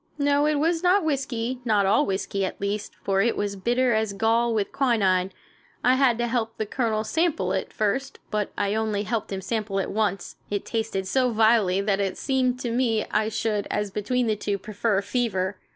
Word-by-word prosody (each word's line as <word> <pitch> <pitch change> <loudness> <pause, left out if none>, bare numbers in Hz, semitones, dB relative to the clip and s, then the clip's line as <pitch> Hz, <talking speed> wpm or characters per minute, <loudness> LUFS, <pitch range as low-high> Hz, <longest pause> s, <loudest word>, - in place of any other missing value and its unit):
No, 285 0 +2
it 305 - +2
was 325 +3 +1
not 365 +2 +4
whiskey, 260 -4 -2
not 210 -4 +2
all 200 +3 +3
whiskey, 195 0 -2
at 190 - -3
least, 200 +1 -3
for 195 0 +2
it 230 +2 +1
was 205 -1 -2
bitter 240 +5 +1
as 220 -2 0
gall 230 +3 +2
with 215 -3 -1
quinine. 195 -8 +2 0.5
I 250 - +5
had 260 -3 +3
to 240 - 0
help 230 -2 -2
the 220 - -1
Colonel 220 -1 -1
sample 290 - 0
it - - -1
at - - -24
first, 265 +6 -1
but 210 -1 -1
I 200 0 0
only 215 -2 -1
helped 215 0 -3
him 190 -1 -3
sample 215 -1 -2
it 195 - -1
once. 205 -3 -1
It 205 -1 -2
tasted 220 -4 -2
so 255 +6 +2
vilely 220 -4 +3
that 200 -1 0
it 195 -2 -1
seemed 255 -2 0
to 240 - -2
me 230 -3 +1
I 215 +1 +1
should, 215 -2 -1
as 210 -1 -2
between 245 +5 0
the 220 -2 +1
two, 205 -1 -2
prefer 205 0 -1
fever. 200 -4 -1
220 Hz, 200 wpm, -25 LUFS, 200-245 Hz, 0.5 s, I